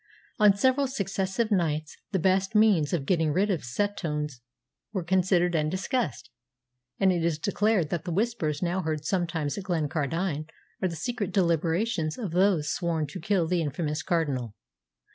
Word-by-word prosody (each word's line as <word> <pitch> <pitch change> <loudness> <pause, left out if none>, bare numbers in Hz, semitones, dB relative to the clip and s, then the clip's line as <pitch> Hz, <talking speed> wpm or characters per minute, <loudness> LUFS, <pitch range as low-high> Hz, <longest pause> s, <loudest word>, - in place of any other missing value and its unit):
On 210 -2 +6
several 260 +5 +3
successive 200 -2 -1
nights 155 -5 0 0.2
the 195 - +1
best 190 +3 +1
means 205 -9 +4
of 160 -6 -1
getting 160 -2 +2
rid 195 +6 +2
of 170 -6 -1
Setoun 150 +1 -2 0.6
were 190 -4 -1
considered 180 0 +2
and 155 -2 +1
discussed, 185 - -2 0.7
and 195 -1 +4
it 175 -2 0
is 165 -2 +1
declared 200 -1 +1
that 170 -1 -2
the 175 - -3
Whispers 175 -6 -1
now 180 +2 0
heard 155 -2 -3
sometimes 165 -3 -1
at 190 - -8
Glencardine 160 -1 -1 0.3
are 190 - +2
the 170 - -5
secret 205 +4 -3
deliberations 170 -1 +1
of 215 -9 -4
those 180 -4 +2
sworn 170 -3 -1
to 145 - -8
kill 180 0 +1
the 175 0 +1
infamous 150 +1 -2
Cardinal. 140 - -1
175 Hz, 160 wpm, -27 LUFS, 155-195 Hz, 0.7 s, On